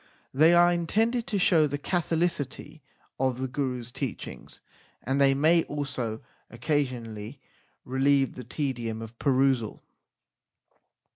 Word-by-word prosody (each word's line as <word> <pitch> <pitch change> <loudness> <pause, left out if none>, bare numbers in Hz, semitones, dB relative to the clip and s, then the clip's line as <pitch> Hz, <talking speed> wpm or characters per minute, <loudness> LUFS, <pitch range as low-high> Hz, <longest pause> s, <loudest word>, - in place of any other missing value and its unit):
They 160 +5 +5
are 175 0 +6
intended 225 +8 0
to 210 - -1
show 165 -4 +4
the 145 0 -3
catholicity 165 -3 -2 0.4
of 130 -1 0
the 130 - -1
Gurus 125 -3 -3
teachings, 130 -1 -6 0.4
and 135 +3 0
they 135 -1 +5
may 160 +4 +4
also 125 -6 -4 0.3
occa 145 +4 0
sionally 115 -1 -8 0.5
relieve 135 +1 +2
the 125 - -8
tedium 120 -4 -3
of 115 +1 -11
perusal. 130 -5 +1
135 Hz, 120 wpm, -27 LUFS, 125-155 Hz, 0.5 s, are